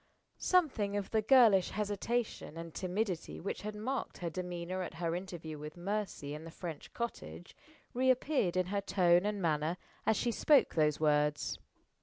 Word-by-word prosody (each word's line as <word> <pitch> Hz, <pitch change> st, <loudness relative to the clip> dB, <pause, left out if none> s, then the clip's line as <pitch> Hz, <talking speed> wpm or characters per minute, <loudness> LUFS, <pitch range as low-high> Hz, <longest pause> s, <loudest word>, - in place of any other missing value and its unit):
Something 250 Hz, -, +2 dB
of 200 Hz, -, -4 dB
the 220 Hz, -, +3 dB
girlish 220 Hz, -5 st, +6 dB
hesitation 210 Hz, -3 st, -2 dB
and 165 Hz, -1 st, -7 dB
timidity 185 Hz, -1 st, -2 dB
which 195 Hz, -, -4 dB
had 210 Hz, 0 st, -5 dB
marked 255 Hz, +6 st, -3 dB
her 170 Hz, -2 st, -4 dB
demeanor 180 Hz, +1 st, -4 dB
at 180 Hz, -, -5 dB
her 165 Hz, 0 st, -1 dB
interview 170 Hz, -4 st, -6 dB
with 150 Hz, +3 st, -8 dB
Mercy 195 Hz, -6 st, -3 dB
in 150 Hz, +1 st, -7 dB
the 165 Hz, -, -8 dB
French 165 Hz, -2 st, -7 dB
cottage 85 Hz, -, -6 dB, 0.4 s
re 260 Hz, +2 st, +2 dB
appeared 255 Hz, -, +2 dB
in 185 Hz, -, +2 dB
her 200 Hz, -, +1 dB
tone 180 Hz, -1 st, +3 dB
and 210 Hz, -1 st, -1 dB
manner 160 Hz, -1 st, 0 dB, 0.3 s
as 220 Hz, -, +4 dB
she 240 Hz, -, +1 dB
spoke 290 Hz, +5 st, +4 dB
those 150 Hz, -2 st, +2 dB
words. 150 Hz, -1 st, +1 dB
185 Hz, 165 wpm, -33 LUFS, 165-215 Hz, 0.4 s, girlish